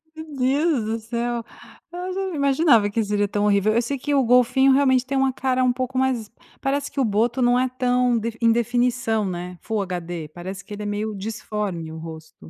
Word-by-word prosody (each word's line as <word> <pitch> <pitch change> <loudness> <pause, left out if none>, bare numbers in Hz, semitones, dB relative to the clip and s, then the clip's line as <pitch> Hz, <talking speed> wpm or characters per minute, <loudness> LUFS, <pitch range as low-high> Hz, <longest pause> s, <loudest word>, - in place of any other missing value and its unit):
Meu 315 0 -8
Deus 275 +1 +2
do 225 +1 -2
céu. 235 +1 -3 0.5
Eu 360 +1 -5
já 385 - -2
não 365 - -5
imaginava 275 -6 +3
que 225 +2 0
seria 205 0 0
tão 205 +1 -1
horrível, 210 +1 +3
eu 235 - +3
sei 275 +4 -3
que 290 +3 -2
o 275 - +4
golfinho 250 +2 +4
realmente 260 -2 +3
tem 270 +1 -2
uma 265 -1 +2
cara 255 0 0
um 250 -1 +3
pouco 255 +1 -3
mais 255 -5 0 0.3
parece 280 +1 -1
que - - -4
o 265 - +3
boto 230 +4 +1
não 245 0 +4
é 255 0 +1
tão 250 -1 +1
defi 230 0 -3
em 230 0 +5
definição 240 -1 +1
né, 180 -1 -5
Full 220 -2 -2
HD, 175 -4 -5
parece 185 +3 -7
que - - -10
ele 210 0 -6
é - - -5
meio 210 +1 -3
disforme 200 -5 -4
o 160 - -8
rosto 160 - -10
235 Hz, 215 wpm, -23 LUFS, 205-260 Hz, 0.5 s, em